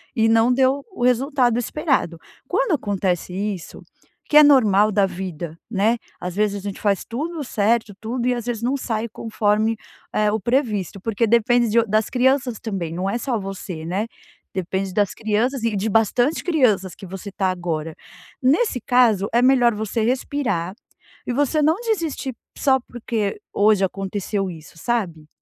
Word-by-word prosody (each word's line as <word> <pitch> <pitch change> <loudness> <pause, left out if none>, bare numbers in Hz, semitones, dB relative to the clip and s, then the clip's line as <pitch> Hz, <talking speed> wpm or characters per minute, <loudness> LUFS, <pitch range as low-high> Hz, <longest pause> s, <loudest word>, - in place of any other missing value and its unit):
e 225 -1 +3
não 225 +2 +4
deu 265 +2 +2
o 245 - -5
resultado 250 -1 +2
esperado. 245 - -1 0.3
Quando - - +1
acontece 190 - -1
isso 195 -3 -4 0.5
que 300 - +4
é 300 - +10
normal 215 -7 +5
da 200 -1 +3
vida, 175 -3 -6
né, 220 +2 +2 0.2
às 180 0 -5
vezes 210 -1 +1
a - - -5
gente 195 - -6
faz 200 -3 +1
tudo 305 +6 -4
certo, 220 -2 0
tudo 240 +2 -2
e, 250 - +3
às 240 -1 -4
vezes 235 -2 -3
não 255 +3 +1
sai 230 -4 -2
conforme, 220 0 0 0.3
eh, 210 -1 +2
o 220 - 0
previsto, 215 - -1
porque 225 +3 0
depende 235 +1 +3
de 230 +2 +4
o 230 - +2
das 215 +1 +1
crianças 255 -2 +1
também. 190 -7 -4
Não 185 +3 -2
é 235 - -1
só 245 -1 -1
você, 190 -4 -6
né. 195 +6 -2 0.4
Depende 190 +1 -3
das 205 -1 +1
crianças 230 +4 -1
e 230 -2 0
de 200 +3 -1
bastante 240 +7 +2
crianças 215 - +2
que 195 - -11
você 195 +2 -8
está 190 -1 0
agora. 165 -3 -3 0.5
Nesse 270 - +2
caso, 230 -6 +3
é 240 - +4
melhor 250 -3 +4
você 220 +2 -2
respirar 235 -7 -1 0.5
e 245 - -1
você 290 +3 +1
não 315 +2 +4
desistir 330 - -2 0.2
só 265 -1 +3
porque 225 -4 -3
hoje 205 -1 +4
aconteceu 195 +1 -3
isso 160 -2 -11
sabe. 175 -8 -2
220 Hz, 170 wpm, -22 LUFS, 195-250 Hz, 0.5 s, é